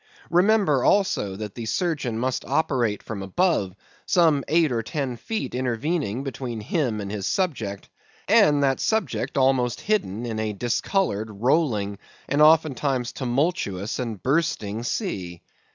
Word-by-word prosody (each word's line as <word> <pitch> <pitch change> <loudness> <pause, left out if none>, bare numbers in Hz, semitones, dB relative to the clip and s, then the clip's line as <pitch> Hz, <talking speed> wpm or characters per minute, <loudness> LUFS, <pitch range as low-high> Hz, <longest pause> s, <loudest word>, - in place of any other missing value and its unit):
Remember, 180 - +3
also, 195 - +2
that 105 0 -6
the 115 -2 -6
surgeon 140 - -1
must 125 +2 -1
operate 130 -6 0
from 105 -3 -6
above, 100 - 0 0.3
some 160 -6 +3
eight 160 -2 +3
or 115 -2 0
ten 130 +1 -3
feet 220 - -4
intervening 130 - -1
between 125 -4 -5
him 115 -1 -1
and 100 -1 -5
his 100 -2 -3
subject, 115 - -2 0.4
and 145 -1 +5
that 135 -2 +2
subject 220 -8 -1
almost 130 -3 +2
hidden 120 - -1
in 110 -2 -3
a 110 -1 -1
discoloured, 115 - -1
rolling, 105 -3 0 0.3
and 145 +2 +1
oftentimes 145 -5 +3
tumultuous 125 - -1
and 115 -6 -4
bursting 130 -8 0
sea. 95 - -4
125 Hz, 135 wpm, -24 LUFS, 110-155 Hz, 0.4 s, and